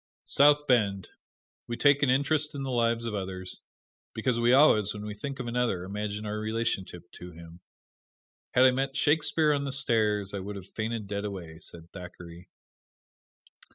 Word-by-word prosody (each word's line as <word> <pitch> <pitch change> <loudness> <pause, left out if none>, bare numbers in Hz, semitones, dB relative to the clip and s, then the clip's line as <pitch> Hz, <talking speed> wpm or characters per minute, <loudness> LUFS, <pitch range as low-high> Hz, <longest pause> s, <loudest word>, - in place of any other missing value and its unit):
South 145 +1 +4
Bend: 100 -8 +1 0.6
We 120 - -4
take 145 -1 +4
an 140 - +3
interest 145 +3 +1
in 140 - -4
the 135 - -3
lives 115 -1 +1
of 115 - -3
others 95 -2 -5 0.5
because 125 -2 0
we 120 +1 +3
always, 110 -7 +5
when 105 0 -7
we 105 - -5
think 135 +6 -6
of 125 - -4
another, 120 -6 -1
imagine 105 +2 -4
our 105 0 -3
relationship 110 -6 -3
to 90 0 -11
him. 85 +1 -13 1.0
"Had 130 - +6
I 130 - +7
met 135 +2 -2
Shakespeare 150 +1 +2
on 140 -1 -1
the 140 - -3
stairs 110 -7 +1
I 100 - -3
would 100 +2 -6
have 95 -2 -8
fainted 110 0 -4
dead 100 0 -4
away," 90 -6 -7
said 85 0 -9
Thackeray. 90 -1 -11
110 Hz, 170 wpm, -28 LUFS, 95-130 Hz, 1.0 s, I